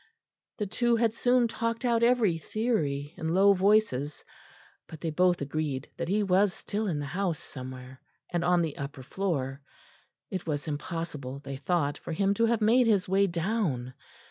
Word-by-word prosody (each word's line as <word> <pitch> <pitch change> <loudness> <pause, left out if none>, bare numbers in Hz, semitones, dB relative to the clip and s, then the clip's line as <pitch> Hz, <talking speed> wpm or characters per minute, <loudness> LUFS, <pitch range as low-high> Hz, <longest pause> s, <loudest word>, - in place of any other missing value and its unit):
The 210 - -1
two 240 +4 +1
had 230 -1 +2
soon 245 +1 +3
talked 230 +1 -2
out 235 -1 +2
every 235 -8 +3
theory 155 - -1
in 160 +1 -1
low 200 +1 +6
voices, 190 -8 +2 0.6
but 160 - -10
they 165 -1 -2
both 180 +1 +2
agreed 145 -1 -3
that 170 - -3
he 205 +4 +1
was 195 0 +3
still 215 +1 -3
in 165 -6 -1
the 145 - -3
house 180 +2 -1
somewhere, 130 -1 -9 0.3
and 170 -1 +1
on 175 -1 +3
the 160 -3 -4
upper 140 -1 -6
floor. 140 -5 -2 0.7
It 185 -3 -4
was 145 0 -2
impossible, 150 -3 -4
they 135 -1 -5
thought, 145 0 0
for - - -6
him 195 +4 +2
to 230 +3 +2
have 230 -1 +1
made 235 +3 +5
his 200 -5 +3
way 195 +1 +3
down. 170 - -1
175 Hz, 170 wpm, -28 LUFS, 145-215 Hz, 0.7 s, low